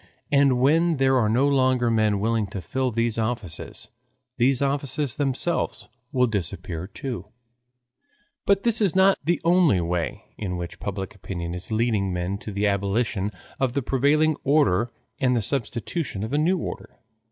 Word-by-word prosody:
And 140 -3 +4
when 160 +5 +3
there 135 0 +3
are 110 -4 +2
no 125 +6 +3
longer 130 -3 +2
men 110 -2 +2
willing 110 0 0
to 100 0 -6
fill 130 +9 -1
these 115 -1 0
offices, 110 -8 -4 0.5
these 130 +1 +3
offices 140 -1 0
themselves 145 +4 -1 0.2
will 125 -3 +3
disappear 90 -5 -3
too. 120 - -6 1.2
But 200 0 +3
this 230 -1 +3
is 195 -5 +2
not 190 +1 +5
the 170 +3 +1
only 170 - +4
way 85 -1 -2 0.2
in 90 -4 -3
which 85 -1 -6
public 95 -1 -4
opinion 85 -4 -5
is 90 +4 -7
leading 110 -4 +1
men 90 +2 -2
to 105 - -7
the 100 +1 -1
abolition 100 +1 0 0.3
of 130 -3 +1
the 140 -1 -1
prevailing 145 +5 +2
order 120 -6 +3 0.3
and 125 -1 +2
the 120 - +1
substitution 120 - -3
of 110 +5 -4
a - - +2
new 175 +5 +2
order. - - -6
120 Hz, 160 wpm, -24 LUFS, 100-140 Hz, 1.2 s, not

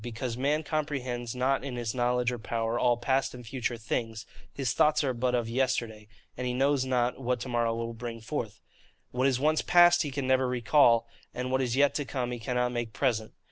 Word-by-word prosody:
Because 120 0 -4
man 145 +5 0
comprehends 130 -6 -3
not 130 +2 +1
in 135 -3 -5
his 120 -2 -3
knowledge 125 0 +1
or 120 - -5
power 115 +2 -2
all 120 -1 +3
past 130 +2 0
and 125 -1 -10
future 120 0 -3
things: 115 0 -3 0.3
his 135 -4 -2
thoughts 150 0 +3
are 130 -2 0
but 125 +1 0
of 120 -2 -1
yesterday, 115 -3 -1 0.3
and 125 - -3
he 125 - -2
knows 135 +1 +2
not 125 -1 0
what 125 0 -1
to - - -5
morrow 120 -1 0
will 115 0 -4
bring 115 0 -6
forth. 110 - -5 0.5
What 130 +2 +1
is 130 -2 +1
once 155 +3 +2
past 175 0 +6
he 150 - -2
can 140 0 -3
never 130 0 +2
recall; 120 -1 +3 0.3
and 125 +1 -3
what 130 0 +2
is 125 -2 -1
yet 140 +1 +4
to 145 - -2
come 125 -2 -3
he 120 - -4
cannot 125 +1 -1
make 120 -2 -4
present. 110 +1 -1
125 Hz, 215 wpm, -28 LUFS, 120-135 Hz, 0.5 s, past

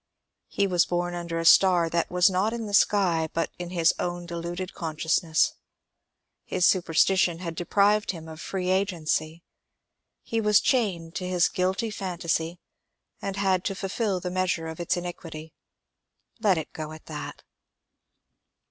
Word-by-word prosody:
He 200 - 0
was 180 -3 +2
bom 175 0 -1
under 170 -1 -4
a 165 - -2
star 180 -1 +6
that 170 0 -1
was 180 0 +4
not 195 +3 +1
in 235 -1 -4
the 205 - -6
sky 180 -6 +3
but 165 - -1
in 175 -1 -5
his 170 -2 +3
own 175 0 -3
deluded 175 +2 -5
consciousness; 160 0 +1 0.9
his 180 - 0
superstition 180 0 +3
had 170 -1 -5
deprived 205 +5 +2
him 165 -3 -4
of 160 0 -9
free 185 -2 -3
agency. 170 -4 -1 0.8
He 225 0 -1
was 210 -1 +5
chained 185 -10 0
to 180 - -4
his 180 -1 +3
guilty 190 +5 -1
phantasy, 175 -4 -2 0.6
and 195 -1 -3
had 190 -2 +1
to 195 - -1
fill 195 0 -2
the 180 0 -4
measure 185 -3 0
of 160 +1 -7
its 175 +2 0
iniquity. 165 -3 -7 0.9
Let 205 -5 +3
it 160 - -5
go 155 0 -6
at 155 - -13
that. - - -7
175 Hz, 150 wpm, -26 LUFS, 165-190 Hz, 0.9 s, star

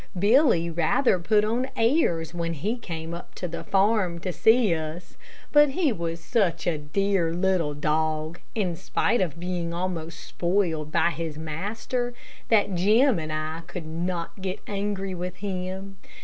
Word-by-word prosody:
Billy 205 - +4
rather 175 - +2
put 210 +4 +3
on 240 +4 0
airs 225 - +2
when 170 -1 -2
he 205 +11 -1
came 165 -8 -6
up 170 - -9
to 180 - -4
the 170 0 -6
farm 195 -3 +2
to 180 +1 -4
see 220 +4 +4
us, 160 +2 -5 0.4
but 295 -1 +6
he 300 0 +1
was 170 -2 -3
such 170 -4 0
a 160 -3 0
dear, 180 +3 +1
little 175 -4 +1
dog, 155 +2 -1 0.2
in 185 -6 0
spite 240 +7 0
of 170 -3 -2
being 175 -1 -3
almost 170 -2 -3
spoiled 170 -4 -1
by 170 0 +3
his 160 -1 -4
master, 210 +10 -3 0.3
that 205 -3 +3
Jim 215 +5 +4
and 155 -1 -4
I 155 +1 -3
could 175 -2 -6
not 170 +3 -4
get 190 0 -3
angry 200 -1 -2
with 180 0 -4
him. 190 0 -5
180 Hz, 155 wpm, -26 LUFS, 165-205 Hz, 0.4 s, but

